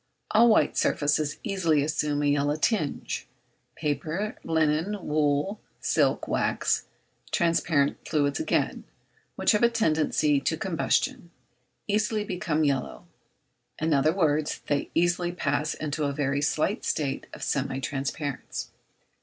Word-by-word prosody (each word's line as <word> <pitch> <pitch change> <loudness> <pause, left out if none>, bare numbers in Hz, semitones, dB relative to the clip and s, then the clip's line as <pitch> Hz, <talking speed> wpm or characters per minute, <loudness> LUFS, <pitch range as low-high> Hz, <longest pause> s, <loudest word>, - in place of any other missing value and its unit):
All 230 +2 +6
white 220 - +3
surfaces 145 0 +1
easily 170 -9 +1
assume 150 -1 0
a - - +1
yellow 145 0 +2
tinge; 155 -2 -1 0.5
paper, 160 +7 -2
linen, 160 +5 +1
wool, 150 +6 0 0.2
silk, - - +1
wax: - - 0 0.5
transparent 165 -5 +2
fluids 145 -2 +1
again, 320 - 0 0.5
which - - +3
have 210 - +2
a 235 - +6
tendency 155 -8 +2
to 160 +4 -1
combustion, 170 -1 0 0.6
easily 210 0 +1
become 175 -5 -1
yellow; 140 +4 -1 0.7
in 160 0 0
other 145 +2 +4
words 155 -4 0
they 145 -1 -1
easily 175 +1 +2
pass 150 -3 -1
into 150 0 -2
a 140 - -1
very 140 -1 0
slight 155 +7 0
state 140 -3 -2
of - - -9
semi 135 -1 -1
transparence. 135 +1 -4
155 Hz, 120 wpm, -27 LUFS, 145-175 Hz, 0.7 s, All